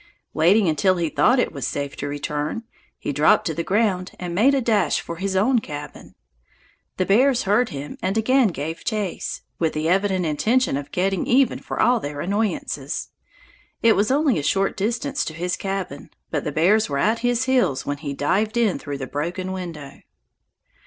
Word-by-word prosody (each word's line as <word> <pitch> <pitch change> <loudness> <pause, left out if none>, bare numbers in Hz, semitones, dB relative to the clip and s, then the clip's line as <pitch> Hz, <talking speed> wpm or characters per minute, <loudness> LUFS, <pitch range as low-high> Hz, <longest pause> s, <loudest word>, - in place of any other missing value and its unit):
Waiting 185 +5 +4
until 165 +4 +2
he 170 -2 0
thought 155 - +3
it 245 - 0
safe 140 +2 -3
to 145 - -4
return, 145 +7 -3 0.3
he 145 - -4
dropped 145 +3 +4
to 160 - -1
the 170 - -2
ground 190 -1 0
and 175 -1 -4
made 250 +10 +4
a - - +2
dash 210 - +2
for 170 - -7
his 190 +1 -2
own 235 +6 +3
cabin. 145 -7 -9 0.8
The 185 - +1
bears 250 +6 +3
heard 210 +5 +2
him 145 +1 -7
and 190 +3 -1
again 255 +2 +4
gave 160 -2 -5
chase, 210 -5 -3 0.2
with 160 -2 +1
the 155 +1 -1
evident 190 0 +1
intention 220 - +1
of 145 +1 -5
getting 190 0 0
even 255 0 +3
for - - -6
all 245 -1 +4
their 145 -5 -6
annoyances. 180 -7 -2 0.7
It 230 -1 +6
was 205 +1 +2
only 275 - +2
a - - -2
short 195 +7 +1
distance 240 +8 -1
to 155 - -6
his 180 +2 -2
cabin, 190 -7 -5 0.2
but 150 -3 -2
the 150 - -1
bears 190 +8 +3
were 140 - -1
at 220 +10 +2
his 245 0 +1
heels 250 - +1
when 145 0 -2
he 140 -2 -5
dived 200 +11 0
in 225 -5 +2
through 145 -1 -5
the 135 - -5
broken 175 +8 -3
window. 165 -7 -7
185 Hz, 185 wpm, -22 LUFS, 150-220 Hz, 0.8 s, It